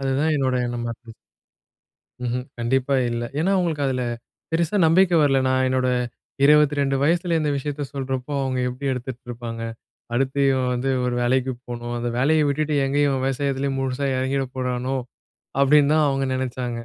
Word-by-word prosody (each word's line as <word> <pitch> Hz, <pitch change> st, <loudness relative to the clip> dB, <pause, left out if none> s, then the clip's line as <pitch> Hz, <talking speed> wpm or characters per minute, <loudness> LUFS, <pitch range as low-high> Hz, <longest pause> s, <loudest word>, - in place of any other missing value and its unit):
அதுதான் 135 Hz, +4 st, +1 dB
என்னோட 130 Hz, -2 st, +1 dB
எண்ணமா 120 Hz, -1 st, -3 dB
இருந்தது. 115 Hz, -1 st, -15 dB, 1.1 s
ம்ஹ்ம். 125 Hz, +1 st, -2 dB
கண்டிப்பா 130 Hz, +3 st, +1 dB
இல்ல. 120 Hz, 0 st, -2 dB, 0.2 s
ஏன்னா, 185 Hz, +5 st, +2 dB
அவங்களுக்கு 160 Hz, -6 st, 0 dB
அதில 130 Hz, -1 st, -1 dB, 0.5 s
பெருசா 170 Hz, +4 st, +1 dB
நம்பிக்கை 175 Hz, +1 st, +4 dB
வரல. 135 Hz, -2 st, +4 dB
நான் 130 Hz, 0 st, +2 dB
என்னோட 130 Hz, 0 st, +1 dB, 0.6 s
22 145 Hz, -2 st, +4 dB
வயசில 170 Hz, +1 st, +2 dB
இந்த 150 Hz, -1 st, 0 dB
விஷயத்த 145 Hz, +1 st, -3 dB
சொல்றப்போ 135 Hz, 0 st, -3 dB
அவங்க 130 Hz, -1 st, -1 dB
எப்படி 130 Hz, +3 st, -7 dB
எடுத்துட்டு 125 Hz, 0 st, -5 dB
இருப்பாங்க, 115 Hz, -1 st, -6 dB, 0.5 s
"அடுத்து 135 Hz, +3 st, 0 dB
இவன் 130 Hz, -1 st, 0 dB
வந்து 125 Hz, +2 st, -1 dB, 0.2 s
ஒரு 125 Hz, -1 st, -1 dB
வேலைக்கு 130 Hz, +1 st, +1 dB, 0.2 s
போணும். 120 Hz, 0 st, -5 dB
அந்த 120 Hz, 0 st, -2 dB
வேலைய 150 Hz, +3 st, +3 dB
விட்டுட்டு 150 Hz, +1 st, 0 dB
எங்க 135 Hz, +1 st, -1 dB
இவன் 135 Hz, -2 st, +1 dB
விவசாயத்திலே 135 Hz, +1 st, -1 dB
முழுசா 135 Hz, +1 st, -1 dB
இறங்கிடப் 130 Hz, 0 st, -1 dB
போறானோ?" 125 Hz, +1 st, -1 dB, 0.6 s
அப்படின்னு 145 Hz, +1 st, +5 dB
தான் 155 Hz, -2 st, +4 dB
அவங்க 135 Hz, 0 st, 0 dB
நினைச்சாங்க. 125 Hz, -1 st, -3 dB
135 Hz, 155 wpm, -23 LUFS, 125-145 Hz, 1.1 s, அப்படின்னு